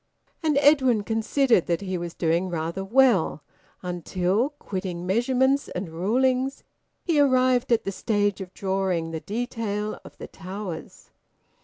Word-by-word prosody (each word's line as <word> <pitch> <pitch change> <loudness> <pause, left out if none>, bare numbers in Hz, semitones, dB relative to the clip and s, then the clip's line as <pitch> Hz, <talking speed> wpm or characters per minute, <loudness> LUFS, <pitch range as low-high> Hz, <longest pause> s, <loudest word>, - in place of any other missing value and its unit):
And 310 -3 +1
Edwin 260 -7 +4
considered 225 - +2
that 170 +1 0
he 190 -2 -3
was 175 -1 -5
doing 170 +2 0
rather 170 +2 -3
well 225 - +3 0.4
until, 180 - 0
quitting 185 - -5
measurements 260 +7 +2
and 180 -1 -5
rulings, 255 +10 0 0.4
he 330 -4 +1
arrived 255 -3 +3
at 230 - +3
the 195 - -2
stage 205 0 0
of 185 -1 -7
drawing 190 -4 -1
the 160 - -3
detail 215 0 -3
of - - -14
the - - -7
towers. 190 -1 -8
205 Hz, 135 wpm, -25 LUFS, 180-255 Hz, 0.4 s, Edwin